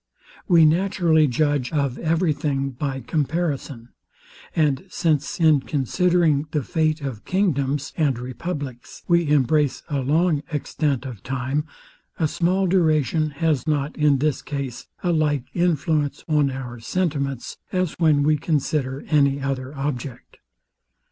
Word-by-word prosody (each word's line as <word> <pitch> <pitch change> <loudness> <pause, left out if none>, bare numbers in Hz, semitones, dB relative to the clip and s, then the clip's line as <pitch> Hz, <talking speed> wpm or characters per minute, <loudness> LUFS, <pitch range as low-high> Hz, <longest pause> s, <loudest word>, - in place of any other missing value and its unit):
We 170 -4 +6
naturally 165 -2 +3
judge 145 -1 0
of 140 -4 -1
every 165 0 +1
thing 140 -2 -2
by 135 +1 -4
comparison; 145 -3 -2 0.7
and 150 -1 +2
since 155 -6 0
in 155 -3 +5
considering 155 +2 +1
the 150 -2 -1
fate 155 +1 0
of 130 -7 -5
kingdoms 145 -7 0
and 145 -6 +1
republics, 130 +1 -6
we 170 -3 +3
embrace 145 0 +2
a 145 -2 -1
long 155 +3 +2
extent 145 -3 -1
of 120 -7 -7
time, 135 +4 -2 0.5
a 160 - +2
small 180 +5 +1
duration 155 -4 +2
has 155 -1 -1
not 150 -1 0
in 150 -2 +3
this 150 +1 0
case 140 -4 -5 0.2
a 175 - +2
like 150 -4 +1
influence 155 -4 0
on 150 -3 +2
our 125 -3 -6
sentiments, 140 -2 -2
as 185 -3 0
when 155 -4 +4
we 155 +1 +3
consider 145 -3 -1
any 140 -2 +3
other 135 -1 -3
object. 135 -3 -5
150 Hz, 130 wpm, -23 LUFS, 135-160 Hz, 0.7 s, We